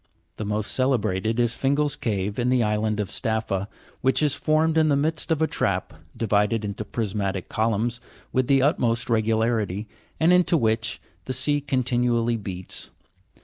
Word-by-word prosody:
The 110 - -4
most 105 0 -1
celebrated 110 -4 0
is 120 -1 +2
Fingal's 140 +1 +1
cave, 105 -6 -2
in 120 +1 +1
the 125 -2 +3
island 105 0 0
of 100 -3 -2
Staffa, 110 -3 -1 0.3
which 130 +4 +2
is 145 -3 +3
formed 155 +2 +1
in 160 -1 +4
the 145 - +4
midst 155 +2 0
of 160 -1 +2
trap, - - -1 0.2
divided 105 0 +1
into 105 +1 -4
prismatic 100 -3 -3
columns 115 +2 0 0.3
with 130 -1 +1
the 135 -1 +4
utmost 120 -6 +1
regu 110 -1 +2
larity, 110 -3 0 0.3
and 165 +3 +5
into 180 -1 +4
which 110 -3 0 0.3
the 130 - -3
sea 145 +3 +1
continually 120 -3 +1
beats. 95 -4 -7
115 Hz, 155 wpm, -24 LUFS, 105-135 Hz, 0.3 s, and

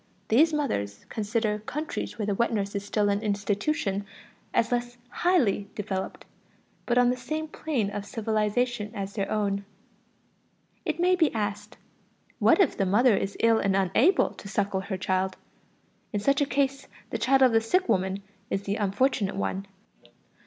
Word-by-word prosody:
These 300 +9 +5
mothers 100 - -2
consider 215 0 -1
countries 295 +8 -4
where 215 - -2
the 205 - 0
wet 235 +5 +1
nurse 200 -3 -1
is 200 -1 -3
still 205 0 0
an 200 0 +1
institution 205 +1 -1 0.5
as 230 - +1
less 245 0 -1
highly 245 - +1
developed, 195 -2 -4 0.6
but 240 - +2
on 245 0 +5
the - - 0
same 310 +6 -4
plane 270 -10 -2
of 205 0 -5
civilization 220 0 -1
as 200 -1 -4
their 200 -3 -2
own. 200 -2 0 1.2
It - - -2
may 365 +1 +4
be 330 -4 +3
asked: 205 -2 -3 0.6
what - - +5
if 375 -8 +4
the 195 - +1
mother 220 +4 +4
is 195 +1 -2
ill 230 -1 +4
and 195 -1 +1
unable 195 - +3
to - - -11
suckle 200 -1 -1
her 190 0 -4
child? 185 +1 -1 0.7
In 205 - -1
such 275 +7 +2
a 285 - +2
case 275 +1 0 0.2
the - - -2
child 270 +1 +4
of 255 - +6
the 225 0 +4
sick 370 +12 +1
woman 190 +1 0 0.3
is 195 - -1
the 200 +1 -2
unfortunate 205 0 +1
one. 195 0 -2
210 Hz, 165 wpm, -27 LUFS, 200-250 Hz, 1.2 s, of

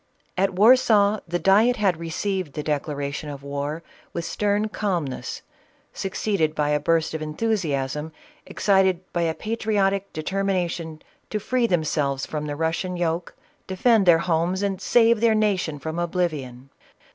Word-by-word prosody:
At 195 0 +1
Warsaw 215 -1 +5
the 175 +1 -1
diet 205 +8 +4
had 195 -7 +1
received 170 0 -3
the 150 - -4
declaration 145 0 -3
of 140 -1 -8
war 145 +3 -4 0.3
with 170 - -3
stern 210 +1 0
calmness, 180 -11 -3 0.5
succeeded 190 -5 -1
by 150 -1 0
a 150 0 +2
burst 160 +2 +1
of 160 - -4
enthusiasm 155 -5 -2 0.3
excited 190 -3 +2
by 175 - 0
a 165 -1 0
patriotic 200 -3 -1
determination 175 -2 -2 0.3
to 215 - -2
free 245 +3 0
themselves 150 -6 0
from 150 -1 -4
the 145 - -3
Russian 165 +4 -2
yoke, 170 0 -2 0.3
defend 200 +1 +3
their 170 -2 +7
homes, 175 +3 0
and 195 -2 -2
save 230 -2 +4
their 230 -2 +4
nation 195 -8 0
from 160 +4 -5
oblivion. 150 -8 -3
175 Hz, 140 wpm, -24 LUFS, 155-200 Hz, 0.5 s, their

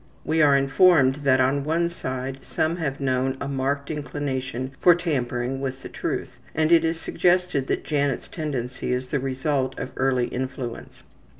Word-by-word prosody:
We 160 +1 +2
are 140 -2 +6
informed 135 -1 +4
that 135 -3 +3
on 135 +2 +2
one 165 +3 +1
side 130 -5 -5
some 160 +5 -1
have 140 -5 -2
shown 130 -1 0
a 140 - -4
marked 140 +1 -1
inclination 130 -3 -3
for 175 -2 +6
tampering 135 -6 -2
with 135 -1 -4
the - - -7
truth, - - -4 0.2
and 155 +1 +2
it 165 -1 +6
is 165 0 0
suggested 180 -8 +1
that - - -1
Janet's 145 -4 -1
tendency 130 -6 -3
is 125 0 -3
the 140 - 0
result 135 +1 -1
of 130 - -5
early 130 -2 +2
influence. 125 -2 -5
135 Hz, 165 wpm, -24 LUFS, 130-155 Hz, 0.2 s, are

